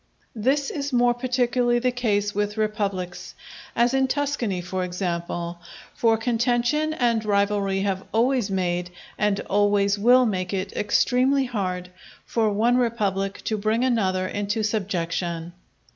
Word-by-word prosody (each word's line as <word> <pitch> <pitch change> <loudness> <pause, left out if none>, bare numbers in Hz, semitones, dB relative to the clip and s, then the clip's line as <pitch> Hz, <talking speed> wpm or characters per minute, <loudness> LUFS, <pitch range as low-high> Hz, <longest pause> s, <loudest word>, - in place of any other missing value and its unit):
This 270 +6 +1
is 285 -1 -3
more 245 -1 +3
particularly 245 -1 +1
the 250 +1 +1
case 205 -4 0
with 205 +1 -2
republics, 200 -4 -3 0.4
as 240 +2 +3
in 265 0 +2
Tuscany 260 -8 -1
for 185 +1 -3
example; 175 -1 -3 0.3
for 225 -1 +2
contention 240 +6 +1
and 240 -7 +1
rivalry 200 -2 +1
have 195 -1 -1
always 240 -1 +2
made, 180 -2 -1 0.3
and 205 -1 +1
always 205 0 +2
will 250 +4 +5
make 185 -3 -1
it 190 0 -3
extremely 260 +6 +2
hard 185 -6 -3 0.4
for 225 -2 +1
one 225 +4 +2
republic 200 -5 -1
to 215 -1 -2
bring 220 +4 +1
another 190 -7 +1
into 205 +3 -2
subjection. 175 -5 -2
210 Hz, 130 wpm, -24 LUFS, 195-245 Hz, 0.4 s, will